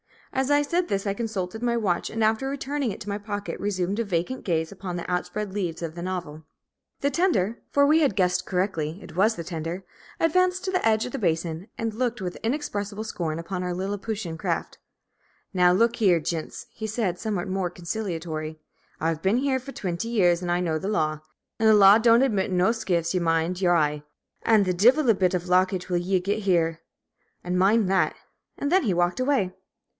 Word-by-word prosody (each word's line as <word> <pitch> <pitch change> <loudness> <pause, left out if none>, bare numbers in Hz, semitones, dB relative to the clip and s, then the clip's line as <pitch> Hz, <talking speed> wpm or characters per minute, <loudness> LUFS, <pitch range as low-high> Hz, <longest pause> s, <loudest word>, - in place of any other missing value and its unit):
As 265 +1 0
I 290 0 +4
said 345 +4 0
this 195 0 -1
I 200 - 0
consulted 215 -2 -4
my 240 -1 +1
watch, 185 -6 0
and 225 0 -1
after 220 +5 +1
returning 280 -2 -2
it - - -7
to 205 - -6
my 200 +1 -2
pocket 205 -1 -5
resumed 195 0 -1
a - - +2
vacant 200 +6 -2
gaze 160 -3 0
upon 190 -2 -6
the 175 - -5
outspread 180 +3 -2
leaves 175 -5 -3
of 160 -1 -4
the 170 - -7
novel. 175 -4 -5 0.6
The 280 - +1
tender 260 - +1
for 285 0 +4
we 310 +3 +5
had 280 -11 +2
guessed 180 0 +1
rightly; 180 -3 -1
it - - -12
was 215 +5 +3
the 170 - -5
tender 165 +2 -5 0.4
advanced 365 +3 +2
to 375 - -1
the 370 - 0
edge 220 0 +2
of 250 - -6
the 275 - -4
basin, 165 -1 -1
and 225 -1 -2
looked 240 0 -1
with 180 -2 -4
inexpressible 215 -5 -2
scorn 170 -7 -3
upon 180 +2 -4
our 180 -1 -2
Liliputian 195 -2 -4
craft. - - -3 0.7
"Now, 180 -1 +5
look 230 +6 +3
here, 185 -7 +4
gints," 160 0 -4
he 220 - -5
said, 210 -5 -1
somewhat 200 -5 -2
more 185 -1 -1
conciliatory, 165 -4 -4 0.4
"I've 160 0 -1
been 195 +6 +2
here 265 0 +1
for 275 +2 -10
twinty 180 +3 -3
years, 180 -7 +3
an' 175 0 0
know 160 -2 0
the 190 - -4
law; 155 -7 0 0.4
an' 220 - +3
the 220 - +7
law 200 +1 +8
don't 230 +2 +5
admit 205 -8 0
no 185 +3 +3
skiffs, 175 -7 -1
ye 185 - +1
mind 165 +2 0
y'ur 175 -2 +4
eye. 150 -2 +1 0.4
An' 220 -2 +5
the 185 -1 0
divil 245 - +4
a - - +7
bit 185 -2 +1
of 175 - -1
lockage 185 0 +2
will 180 - +1
ye 185 +2 +1
git 200 +4 -1
here, 170 -5 +1 0.6
an' 180 +1 -1
mind 200 +3 +4
that!" 190 - +2 0.4
And 285 - -2
then 375 0 +4
he 205 -7 +1
walked 175 +5 +1
away. 255 -9 +1
195 Hz, 205 wpm, -25 LUFS, 175-225 Hz, 0.7 s, law